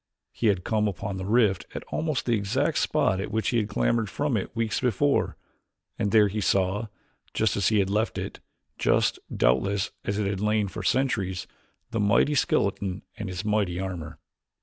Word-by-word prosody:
He 115 - -1
had 95 -4 +2
come 105 -1 +1
upon 100 +1 -4
the 95 0 -4
rift 105 -5 +2
at - - -4
almost 155 -6 -1
the 120 - +1
exact 100 -3 +1
spot 95 +1 +1
at - - -4
which 110 0 0
he 120 - +1
had 105 -2 0
clambered 110 +1 +1
from 145 +1 -1
it 100 +2 -3
weeks 115 -2 0
before, 130 +3 +1 0.6
and 100 - +1
there 105 0 +5
he 105 +2 -3
saw, 100 +3 +1 0.5
just 110 -4 +2
as 100 - +1
he 110 - +3
had 100 -1 +2
left 110 +2 0
it, - - -5 0.4
just, - - +2
doubtless, 95 +11 +1
as 100 - -2
it 105 - 0
had 100 -1 -1
lain 105 -1 +2
for 110 - -6
centuries, 95 -5 0 0.5
the 115 - -1
mighty 105 +8 +3
skeleton 100 -7 0
and 100 -2 -5
its 90 +1 -5
mighty 105 -4 0
armor. 90 -5 -5
105 Hz, 185 wpm, -26 LUFS, 95-110 Hz, 0.6 s, there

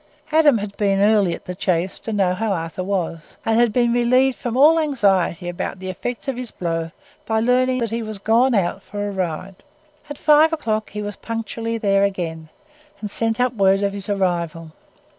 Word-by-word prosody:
Adam 305 -5 +5
had 205 -1 -5
been 200 -2 +1
early 200 -4 +3
at - - -15
the 180 - -5
Chase 180 0 -1
to 225 - -5
know 195 -4 +1
how 215 +3 -2
Arthur 165 0 -3
was, 180 -4 -4
and 225 0 +2
had 240 -2 +4
been 240 +1 +2
relieved 255 +2 +3
from 240 0 -4
all 310 +4 +6
anxiety 195 - +1
about 175 +2 -4
the 185 0 -5
effects 245 +8 -6
of 265 -3 -2
his 250 -2 -4
blow 165 -3 -3 0.4
by 220 0 +1
learning 255 +2 +2
that 230 -3 -2
he 230 +1 -2
was 215 -2 -5
gone 230 +5 +3
out 190 0 0
for 205 +1 -5
a - - -3
ride. 185 0 -4 0.5
At 290 - -6
five 305 +2 +5
o'clock 220 -8 -2
he 210 0 -5
was 205 -1 -6
punctually 230 0 -4
there 200 -2 +2
again, 165 -5 -3 0.5
and 210 -2 -5
sent 225 +1 -1
up 250 0 +2
word 195 -2 +3
of 200 0 0
his 200 0 -7
arrival. 170 -5 -1
205 Hz, 200 wpm, -21 LUFS, 185-235 Hz, 0.5 s, all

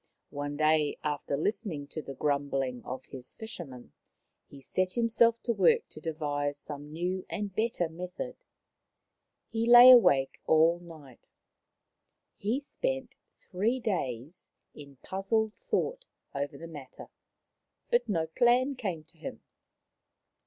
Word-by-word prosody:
One 145 0 -4
day, 155 -1 +2
after 145 -1 -2
listening 165 -3 -2
to 155 - -5
the 135 -1 -8
grumbling 135 -4 -1
of 130 +1 -6
his 130 -2 -11
fishermen, 165 - -8 0.6
he 140 - -13
set 185 +7 -1
himself 230 0 +3
to 235 - 0
work 190 -5 +3
to 155 - -12
devise 145 -3 -2
some 145 0 -7
new 180 +3 -2
and 205 -2 -4
better 220 -5 0
method. 180 +10 -6 1.2
He 225 +1 -1
lay 240 +1 +11
awake 180 - +5
all 165 +2 +4
night; 155 -7 -14 1.1
he 220 +7 -1
spent 265 -2 -3 0.2
three 215 +7 -1
days 155 - -4 0.2
in 140 -1 -12
puzzled 215 +3 -1
thought - - -2 0.3
over 140 +1 -3
the 165 - -9
matter, 145 -5 -11 0.8
but 480 - +2
no 165 -5 +1
plan 245 - +3
came 190 - -4
to 160 +1 -23
him. - - -8
170 Hz, 125 wpm, -30 LUFS, 145-225 Hz, 1.2 s, lay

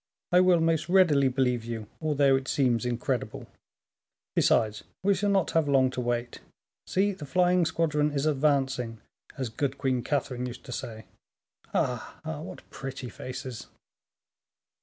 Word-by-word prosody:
"I 180 - +6
will 180 -2 +5
most 165 0 +1
readily 165 -7 +5
believe 125 -2 +1
you, 115 -2 -5 0.2
although 145 -3 +3
it 135 0 -2
seems 125 -3 +1
incredible; 120 -1 -2 0.9
besides 110 -1 +2 0.2
we 200 +1 +4
shall 200 +2 0
not 195 -3 +2
have 160 -3 +2
long 130 -2 +4
to 130 - -3
wait. 120 0 -2 0.5
See, 200 +2 +2
the 170 -7 -8
flying 180 +1 +3
squadron 150 -2 +1
is 140 0 -1
advancing, 135 -6 +1 0.4
as 130 -4 -2
good 135 +4 -2
Queen 130 -3 0
Catherine 125 -3 -1
used 120 0 -8
to - - -9
say. 110 -3 -6 0.7
Ah! 125 -2 -2
ah! 155 -1 -4
what 165 - -9
pretty 135 -2 -6
faces!" 130 -2 -7
135 Hz, 145 wpm, -28 LUFS, 125-160 Hz, 0.9 s, I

